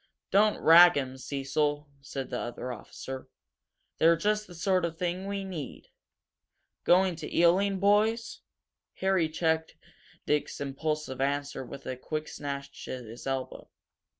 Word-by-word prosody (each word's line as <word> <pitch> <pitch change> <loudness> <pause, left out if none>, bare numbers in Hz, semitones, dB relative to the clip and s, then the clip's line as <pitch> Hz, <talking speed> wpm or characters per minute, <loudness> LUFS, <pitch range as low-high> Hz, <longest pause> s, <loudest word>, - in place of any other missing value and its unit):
"Don't 210 +2 +4
rag 175 +2 +8
them, 130 -2 -2
Cecil," 145 +3 -1
said 135 -1 -6
the - - -2
other 120 +1 -5
officer. 130 +3 -8 0.7
"They're 165 +1 +6
just 210 +4 0
the 175 - -12
sort 185 +2 +1 0.2
we 190 +3 -2
need. 170 -8 -7 1.0
Going 185 0 +4
to 155 -2 -7
Ealing, 190 +3 +3
boys?" 215 +4 +2 0.6
Harry 190 -4 +1
checked 160 0 0 0.5
Dick's 150 0 0
impulsive 140 -1 -3
answer 140 0 -1
with 135 +2 -10
a 130 - -3
quick 155 +4 -4
snatch 140 -1 -6
at 125 -2 -5
his 115 +4 -9
elbow. 135 -1 -4
155 Hz, 125 wpm, -29 LUFS, 135-185 Hz, 1.0 s, rag